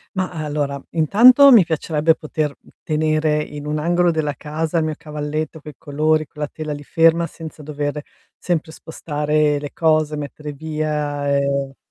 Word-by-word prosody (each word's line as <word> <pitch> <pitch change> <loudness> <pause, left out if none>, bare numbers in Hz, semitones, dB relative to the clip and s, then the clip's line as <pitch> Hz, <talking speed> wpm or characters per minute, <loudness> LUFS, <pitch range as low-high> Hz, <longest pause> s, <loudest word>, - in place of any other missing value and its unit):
Mah, 185 -1 -1
allora, 145 -3 -3
intanto 245 - +7
mi 215 - +8
piacerebbe 160 0 +1
poter, 155 -1 -2
uhm, - - -21
tenere 155 -1 +1
in 150 -1 -9
un 150 0 -2
angolo 175 +2 +2
della 155 -3 -1
casa 155 +3 -3
il 160 - 0
mio 155 -1 -2
cavalletto 150 +1 -5
coi 150 +1 -10
colori, 155 +1 0
con 150 - -12
la 150 - -2
tela 155 -1 -5
lì 145 0 -8
ferma, 165 +2 +3
senza 160 -2 -10
dover 145 0 -3 0.4
sempre 160 -3 -2
spostare 150 -2 -1
le 145 0 -6
cose, 155 -2 +1
mettere 150 +1 -6
via, 150 -1 -3
e 140 -1 -1
155 Hz, 160 wpm, -20 LUFS, 150-160 Hz, 0.4 s, mi